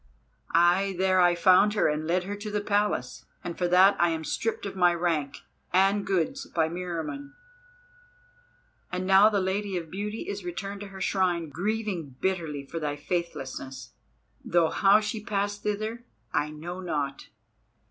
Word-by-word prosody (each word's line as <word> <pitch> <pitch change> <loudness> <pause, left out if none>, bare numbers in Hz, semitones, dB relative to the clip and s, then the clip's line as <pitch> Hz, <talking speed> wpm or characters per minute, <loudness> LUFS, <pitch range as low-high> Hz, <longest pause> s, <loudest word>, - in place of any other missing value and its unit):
Ay, 180 +3 +4
there 185 0 +3
I 175 -1 +5
found 185 +4 +5
her 210 - +3
and 155 +1 -1
led 180 +2 +1
her 200 +2 -4
to 210 +1 -6
the 210 0 -1
Palace, 205 0 -1 0.2
and 175 -2 -5
for 180 - 0
that 185 +3 +6
I 175 - +4
am 160 -1 -2
stripped 225 +8 -2
of 195 - -5
my 175 -2 +4
rank 165 -5 -1 0.3
and 195 +2 +3
goods 195 +8 -1
by 160 -1 0
Meriamun, 180 - -5 1.6
and 180 +1 -2
now 195 +3 +7
the 205 -2 +1
Lady 190 +1 -1
of 165 -2 -6
Beauty 210 +3 -4
is 405 - -4
returned 200 - -5
to 205 - -6
her 195 -1 -10
shrine, 180 -4 0
grieving 185 - -3
bitterly 165 -7 -2
for 165 +4 -5
thy 150 -2 -2
faithlessness; 135 -6 -5 0.5
though 170 -2 +2
how 200 +2 +5
she 210 0 -4
passed 205 0 -2
thither 215 +3 -3 0.3
I 150 -2 +1
know 170 +4 -7
not." 145 -6 -3
185 Hz, 160 wpm, -27 LUFS, 165-205 Hz, 1.6 s, now